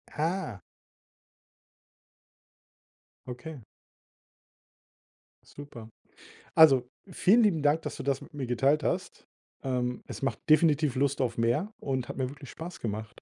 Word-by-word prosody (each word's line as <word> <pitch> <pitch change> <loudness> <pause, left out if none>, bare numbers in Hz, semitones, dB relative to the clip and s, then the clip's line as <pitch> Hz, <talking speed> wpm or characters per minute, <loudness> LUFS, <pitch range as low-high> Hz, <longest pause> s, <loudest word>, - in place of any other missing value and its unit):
Ah. 160 - -2 2.7
Okay. 130 +5 -7 1.9
Super. 120 -6 -11 0.7
Also, 135 -6 +6 0.2
vielen 220 +6 +4
lieben 170 -8 +2
Dank, 150 +2 +3
dass - - -5
du - - -6
das 135 -1 0
mit - - -13
mir 135 -3 -4
geteilt 135 +5 +2
hast. - - -3 0.4
Ähm, 125 -2 -2
es - - -8
macht 135 - -1
definitiv 155 -3 +4
Lust 140 +1 +1
auf 120 -2 -1
mehr 125 - 0
und 130 -3 -3
hat - - -6
mir 130 -1 -1
wirklich 140 -2 -11
Spaß 170 +2 -8
gemacht. 110 +1 -5
140 Hz, 125 wpm, -29 LUFS, 125-155 Hz, 2.7 s, Also